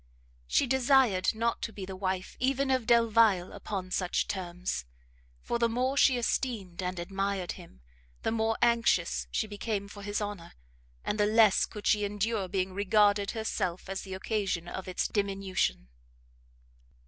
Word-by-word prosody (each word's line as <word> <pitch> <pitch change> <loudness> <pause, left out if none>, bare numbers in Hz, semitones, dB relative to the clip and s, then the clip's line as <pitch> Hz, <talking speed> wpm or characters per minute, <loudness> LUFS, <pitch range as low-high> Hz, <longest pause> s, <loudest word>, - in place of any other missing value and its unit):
She - - +3
desired 255 -6 +3
not 230 +1 -1
to 230 - -3
be 200 -3 -7
the 190 0 -7
wife 185 -1 -3
even 270 +1 +1
of 255 -3 +1
Delvile 225 -5 +4
upon 185 -3 -5
such 180 -1 0
terms, 180 - -3 0.6
for 235 - -1
the 235 0 +3
more 255 +4 0
she 265 -2 +5
esteemed 225 -7 -2
and 180 0 -3
admired 195 +1 -2
him, 60 0 -12 0.4
the - - 0
more 225 0 0
anxious 235 -1 +2
she - - -1
became 205 -1 -3
for 205 0 -11
his 205 +1 -2
honour, 205 -5 -5 0.5
and 210 - -1
the 205 - +4
less 215 -2 +5
could 210 -2 -9
she 210 -1 +3
endure 205 0 -1
being 185 0 -2
regarded 205 0 +3
herself 190 -5 -2
as 195 0 -3
the 190 -1 -6
occasion 190 -4 -2
of 190 +1 -6
its 185 - -1
diminution. 195 - -1
205 Hz, 155 wpm, -29 LUFS, 185-230 Hz, 0.6 s, she